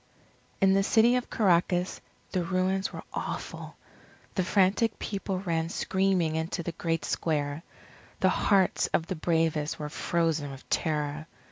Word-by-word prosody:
In 195 0 +5
the 195 - +4
City 230 +4 +4
of 250 - -4
Caracas, 180 -2 +2 0.3
the 180 -2 0
ruins 185 +2 0
were - - -7
awful. - - -5 0.6
The 185 - +1
frantic 200 +4 +2
people 195 -2 -3
ran 165 -3 -1
screaming 190 -4 +1
into 165 +2 -2
the 170 - -3
great 165 0 -2
square. 145 -2 -1 0.6
The - - +4
hearts 195 -3 +2
of 165 - +1
the 185 - -3
bravest 160 -2 0
were 150 -1 -5
frozen 160 -2 0
with 135 -1 -11
terror. 150 -1 -1
170 Hz, 140 wpm, -28 LUFS, 160-190 Hz, 0.6 s, In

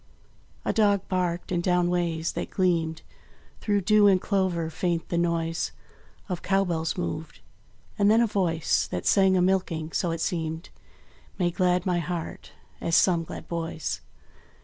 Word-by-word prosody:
A - - +1
dog 205 -4 +2
barked; 180 -2 -1
and 175 -1 +1
down 180 -1 +2
ways, 170 -2 0
that - - -4
gleamed, 165 -4 0 0.6
Through 205 -2 +1
dew 210 +2 +5
and 190 -2 +5
clover 180 -5 0
faint 170 -1 -2
the 170 - -1
noise 165 -1 -1 0.5
Of 180 -4 -4
cow 195 0 +2
bells 165 -2 -2
moved. 85 -1 -4 0.6
And 200 0 +5
then 220 +2 +5
a 235 - +5
voice, 180 -7 +1
That - - -4
sang 190 -2 +4
a 180 - +3
milking, 180 -4 0
so 175 - 0
it 165 0 -2
seemed, 160 -1 -3 0.7
Made 175 -2 0
glad 180 -1 +1
my 180 -2 +1
heart 170 0 -5 0.3
as 165 -1 +1
some 170 -1 +4
glad - - -9
boy's. 165 -2 -3
175 Hz, 155 wpm, -26 LUFS, 165-190 Hz, 0.7 s, dew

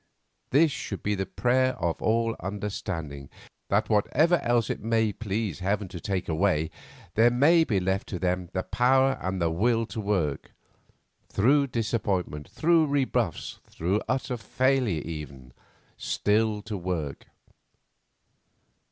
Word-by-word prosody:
This 155 +3 +4
should 100 -6 -5
be 105 - 0
the 95 -2 -2
prayer 130 +4 +2
of 85 -2 -2
all 115 +1 +2
of - - -15
understanding, 90 -7 -5 0.4
that 105 +2 +2
whatever 150 - +3
else 120 -2 +1
it - - -4
may 110 -1 +1
please 105 -4 -3
Heaven 100 +2 -1
to 90 - -7
take 95 +1 -2
away, 80 -2 +1 0.4
there 115 +2 +5
may 150 +8 +5
be 105 -10 +1
left 95 +2 -1
to 90 - -4
them 90 0 -1
the 95 -1 -2
power 130 +2 +2
and 95 0 -2
the 85 -2 +1
will 115 +6 +1
to 110 - -5
work, 90 -9 -1 0.8
through 140 +7 +3
disappointment, 105 - -2
through 165 -1 +3
rebuffs, 140 -2 -1
through 95 +6 -1
utter 130 -1 -1
failure 125 - +1
even, 70 -6 -8 0.5
still 105 0 +1
to 110 -1 -5
work. 85 -6 -4
105 Hz, 135 wpm, -27 LUFS, 90-120 Hz, 0.8 s, there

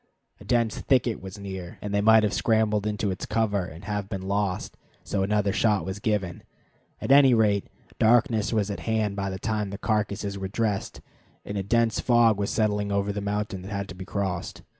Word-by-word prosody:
A - - -12
dense 115 -3 +1
thicket 125 -4 +1
was 95 +2 -8
near, 95 -3 -7
and 105 -1 -5
they 100 - +2
might 110 +1 +6
have 105 - +1
scrambled 110 -2 +1
into 105 -1 -1
its 95 - -5
cover 105 -4 0
and 85 0 -10
have 105 -2 -3
been 95 -3 -4
lost, 100 -1 -2 0.3
so 100 - -2
another 100 0 +1
shot 105 -6 +2
was 95 +2 -5
given. 100 -5 -1 0.6
At - - -2
any 135 -3 +7
rate, 105 -3 +2 0.3
darkness 115 -1 +3
was 105 -3 0
at 100 - -5
hand 110 -3 -1
by 100 -1 -2
the 95 - -4
time 105 +1 -2
the 100 - -6
carcasses 100 -2 -1
were 95 - -3
dressed, 105 0 -2 0.4
and 100 - -5
a 100 - 0
dense 115 +3 +1
fog 120 -4 +4
was 100 - -1
settling 105 -2 0
over 100 0 0
the 100 - -3
mountain 100 -1 -3
that 95 +3 -9
had 100 -1 -3
to - - -8
be 95 - -7
crossed. 95 -2 -4
105 Hz, 205 wpm, -26 LUFS, 100-110 Hz, 0.6 s, any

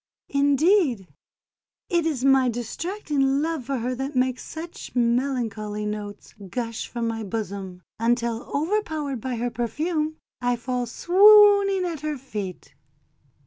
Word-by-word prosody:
Indeed, 280 - +2 0.7
it 340 -3 +1
is 270 -5 -1
my 270 -2 +5
distracting 275 - -1
love 320 -5 -2
for 275 +1 -2
her 250 +2 -2
that 270 +3 -4
makes 255 0 0
such 330 -2 -8
melancholy 235 -4 0
notes 210 -1 -6 0.2
gush 230 +1 -4
from 235 -1 -3
my 225 -1 -3
bosom, 195 -3 -5 0.2
until, 235 0 0
overpowered 310 - -1
by 255 +1 -3
her 240 +1 -2
perfume, 305 +7 -2 0.2
I 245 0 +1
fall 245 0 -3
swooning 400 - +6
at 335 -4 -3
her 305 -1 -2
feet." 205 - -7
255 Hz, 125 wpm, -24 LUFS, 230-315 Hz, 0.7 s, swooning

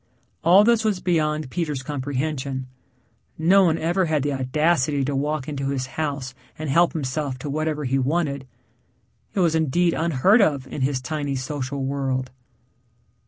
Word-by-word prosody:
All 180 +5 +7
this 230 0 +3
was 210 -4 +1
beyond 155 -5 0
Peter's 150 -7 -2
comprehension. 135 -1 -3 0.7
No 185 +4 +5
one 165 -2 +2
ever 175 +4 +1
had 155 -4 0
the 145 0 0
audacity 140 +1 +1
to 140 +1 -2
walk 145 0 -1
into 140 -2 -3
his 135 -2 -2
house 140 -4 -3 0.2
and 155 -3 -3
help 170 +4 +4
himself 140 -2 -2
to 140 +3 -5
whatever 155 0 -2
he 135 +1 +1
wanted 140 -1 -1 0.9
he - - 0
was 170 -3 +3
indeed 165 +2 +2
unheard 170 - +3
of 145 -8 +2
in 135 - -6
his 130 0 0
tiny 145 0 -2
social 135 0 -3
world. 135 -2 -2
145 Hz, 155 wpm, -23 LUFS, 135-160 Hz, 0.9 s, All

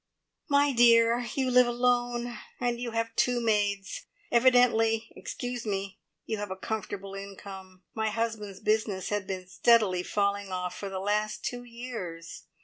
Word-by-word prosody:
"My 285 0 +4
dear, 235 0 +5
you 260 -2 +1
live 250 0 +6
alone, 245 0 0 0.2
and 240 -1 -1
you 245 - -2
have 230 0 -2
two 245 -1 +2
maids. 205 -3 0 0.2
Evidently 235 -2 +4
excuse 245 -1 -5
me 195 -2 -3 0.3
you 220 - -2
have 205 -1 -4
a 190 - -4
comfortable 195 -1 -5
income. 195 -1 -9
My 220 -1 0
husband's 215 -3 -3
business 215 -3 0
has 205 -2 -1
been 185 -1 -5
steadily 210 -3 +3
falling 200 0 -1
off 180 -1 -3
for 200 - -5
the 190 -1 -4
last 210 +2 -1
two 245 0 -3
years. 230 -9 -7
220 Hz, 145 wpm, -28 LUFS, 195-240 Hz, 0.3 s, live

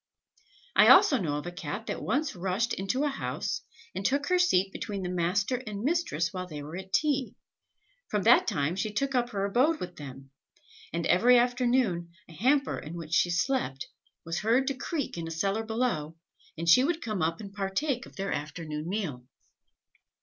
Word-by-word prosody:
I - - +7
also 270 - +7
know 150 -6 -1
of 150 - -6
a 175 - -4
Cat 205 +5 -5
that - - -4
once 280 +7 -1
rushed 190 +6 -1
into 195 +9 -1
a - - +2
house, 275 - -3 0.3
and 190 - -4
took 280 +6 +1
her 365 0 +3
seat 195 - +3
between 200 -2 -4
the 180 - -3
master 185 +7 0
and 205 0 -5
mistress 270 - 0
while 185 -1 -4
they 150 -4 -7
were 155 +3 -8
at 190 +1 -8
tea; 280 0 +1 0.7
from 210 -2 -1
that 235 +3 +6
time 160 -5 0
she 210 +3 -2
took 270 +6 -1
up 245 -1 +1
her 200 -3 -2
abode 260 +11 +2
with 180 -1 -7
them, 135 -2 -10 0.6
and 170 +1 -2
every 245 +7 +5
afternoon 240 -7 +1 0.2
a 170 - -14
hamper 265 - +1
in 155 +3 -8
which 165 -1 -7
she 175 - +4
slept, 180 - -1 0.4
was 165 +1 -2
heard 235 +5 +2
to - - -1
creak 275 - -4
in 165 - -4
a - - -5
cellar 195 +6 -1
below, 220 -9 -1 0.4
and 165 +1 -4
she 250 +10 +7
would 325 +3 0
come 215 -5 -2
up 165 +1 0
and 200 -2 -9
partake 220 +7 -2
of - - -17
their 195 0 -3
afternoon 150 +1 -5
meal. 155 -12 -3
195 Hz, 190 wpm, -28 LUFS, 170-250 Hz, 0.7 s, I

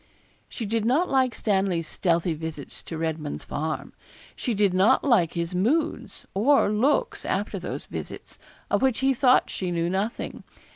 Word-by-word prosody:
She 230 - -5
did 225 +1 0
not 275 +11 +2
like 260 -2 +2
Stanley's 190 -5 0
stealthy 170 0 0
visits 155 -3 -6
to 165 - -5
Redman's 160 -2 -3
Farm; 155 +1 -4 0.4
she 240 -4 -2
did 200 -2 +2
not 200 +8 +4
like 215 - +3
his 170 +1 -2
moods 245 - -1
or 235 +2 +3
looks 250 +8 +1
after - - -2
those - - -5
visits, - - -8 0.3
of - - +2
which 265 -3 +2
he 270 0 +3
thought 255 0 +4
she 185 - -3
knew 170 0 -1
nothing. 200 +4 -3
200 Hz, 155 wpm, -25 LUFS, 170-250 Hz, 0.4 s, not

